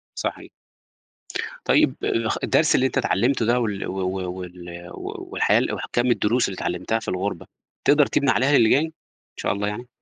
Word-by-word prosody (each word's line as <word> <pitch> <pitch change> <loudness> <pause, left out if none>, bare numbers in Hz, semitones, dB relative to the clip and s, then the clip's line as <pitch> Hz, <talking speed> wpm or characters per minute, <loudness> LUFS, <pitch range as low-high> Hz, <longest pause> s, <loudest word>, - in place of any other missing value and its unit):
صحيح. - - -4 1.2
طيب - - +4 0.3
خ - - -1
الدرس - - +3
اللي 130 - +4
أنت 130 - -1
اتعلمته 120 -2 +1
ده 120 +1 +3
وال 105 -4 -2
و 95 +1 -3
و 95 -1 -2
وال 85 -1 -9
والحياة - - 0
وكمّ 120 +1 -1
الدروس 120 +1 +2
اللي 95 - -5
اتعلمتها 90 +6 -1
في 110 - -10
الغُربة، 95 -1 -2 0.4
تقدر 145 0 +5
تبني 140 -2 +2
عليها 135 +4 +3
اللي 115 -2 +5
جاي 145 +4 +4
إن 160 - -6 0.4
شاء - - -1
الله 105 +1 -2
يعني؟ 120 +4 -5
110 Hz, 170 wpm, -23 LUFS, 95-125 Hz, 1.2 s, تقدر